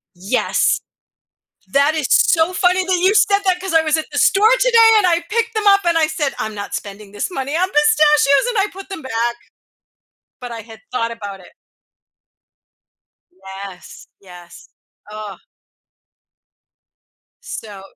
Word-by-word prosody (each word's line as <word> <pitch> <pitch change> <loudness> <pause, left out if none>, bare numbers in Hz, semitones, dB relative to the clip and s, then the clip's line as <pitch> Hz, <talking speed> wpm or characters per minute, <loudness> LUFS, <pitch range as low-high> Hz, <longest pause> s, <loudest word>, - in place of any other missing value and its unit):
yes! 195 +8 0 0.9
That 285 +3 +3
is 305 -4 -1
so 365 -9 +3
funny 365 0 +1
that 370 -1 0
you 390 +3 +3
said 405 -2 +3
that 360 -1 +1
'cause 380 -3 -4
I 325 - +5
was 310 0 +1
at 315 - -4
the - - -3
store 430 +4 +4
today 465 -3 +5
and 385 - +2
I 340 -1 +2
picked 460 0 -1
them 430 -1 -2
up 395 -1 +5
and 340 -1 +2
I 315 - +3
said, 305 -3 -3
"I'm 215 0 -4
not 205 0 -7
spending 200 0 -8
this 205 - -4
money 280 -1 -4
on 370 +2 +1
pistachios." 295 - +3
And 460 - -3
I 395 - +2
put 390 +1 -11
them 385 -5 -8
back. 235 -1 -2 1.0
But 245 -1 -8
I 230 -1 -7
had 225 0 -15
thought 230 -2 -2
about 205 -4 -8
it. 180 - -17 1.8
Yes, 190 - -11
yes, 180 -2 -15 0.4
uh. 210 -2 -8 2.1
So 205 -3 -9
300 Hz, 155 wpm, -18 LUFS, -, 2.1 s, I